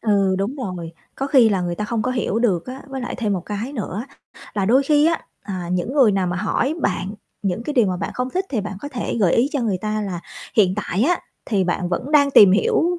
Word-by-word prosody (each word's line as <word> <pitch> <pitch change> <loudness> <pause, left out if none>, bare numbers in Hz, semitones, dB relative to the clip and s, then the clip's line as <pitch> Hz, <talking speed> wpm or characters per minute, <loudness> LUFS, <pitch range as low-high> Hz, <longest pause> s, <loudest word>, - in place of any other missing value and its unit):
Ừ, 200 -3 +2
đúng 205 +9 -2
rồi. 180 - -5 0.2
Có 270 - -2
khi 260 -5 +5
là 195 -3 +1
người 175 -1 -2
ta 210 - -3
không 220 +1 -1
có 250 - -1
hiểu 240 -4 -1
được 195 -8 +1
á. 260 +1 -7
Với 270 -1 -5
lại 245 - -4
thêm 215 -4 0
một 190 - -1
cái 210 +6 -4
nữa 215 -3 -4 0.5
là 200 -2 0
đôi 250 +7 +4
khi 295 +2 +4
á, 330 0 +1 0.2
à, 185 -3 -5
những 180 +7 -1
người 255 -8 +5
nào 190 -2 +1
mà 175 0 -2
hỏi 230 - 0
bạn 200 -7 -1 0.3
những 195 +3 -1
cái 300 - -3
điều 240 -6 +4
mà 185 -1 -1
bạn 195 - -3
không 250 +1 -2
thích 375 +5 -1
thì 245 -6 -1
bạn 205 +1 -5
có 285 - -5
thể 245 -6 -3
gợi 185 -5 +4
ý 245 +4 +3
cho 285 - 0
người 210 -6 0
ta 215 +2 -2
là 185 -4 -4 0.4
hiện 190 -4 +4
tại 210 -1 -1
á 350 +7 +3 0.3
thì 200 -5 +1
bạn 175 0 -1
vẫn 180 +11 -3
đang 285 -2 +5
tìm 200 -8 +8
hiểu, 355 - +2
215 Hz, 260 wpm, -21 LUFS, 190-265 Hz, 0.5 s, tìm